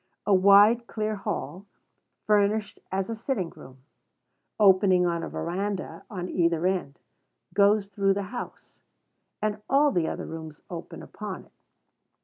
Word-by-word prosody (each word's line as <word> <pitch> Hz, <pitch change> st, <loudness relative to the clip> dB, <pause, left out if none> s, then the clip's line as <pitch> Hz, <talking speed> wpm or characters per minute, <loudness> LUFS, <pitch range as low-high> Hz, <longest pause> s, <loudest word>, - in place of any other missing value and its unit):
A 205 Hz, -, +3 dB
wide, 200 Hz, +5 st, +6 dB
clear 215 Hz, -1 st, -2 dB
hall, 190 Hz, -1 st, -5 dB, 0.6 s
furnished 210 Hz, 0 st, +1 dB
as 190 Hz, 0 st, -1 dB
a 230 Hz, -, -4 dB
sitting 215 Hz, -7 st, -3 dB
room, 130 Hz, 0 st, -15 dB, 0.8 s
opening 190 Hz, -2 st, +5 dB
on 170 Hz, -1 st, 0 dB
a -, -, -5 dB
veranda 190 Hz, +3 st, -4 dB
on 180 Hz, -4 st, -5 dB
either 170 Hz, -2 st, +1 dB
end, 180 Hz, -7 st, -1 dB, 0.6 s
goes 200 Hz, 0 st, +4 dB
through 195 Hz, -1 st, +1 dB
the 200 Hz, -, -2 dB
house; 245 Hz, -, -8 dB, 0.6 s
and 210 Hz, 0 st, -1 dB
all 285 Hz, +2 st, +4 dB
the 170 Hz, -8 st, 0 dB
other -, -, -4 dB
rooms 160 Hz, -2 st, -9 dB
open 170 Hz, -1 st, -7 dB
upon 205 Hz, -2 st, -7 dB
it. -, -, -27 dB
195 Hz, 135 wpm, -26 LUFS, 175-210 Hz, 0.8 s, wide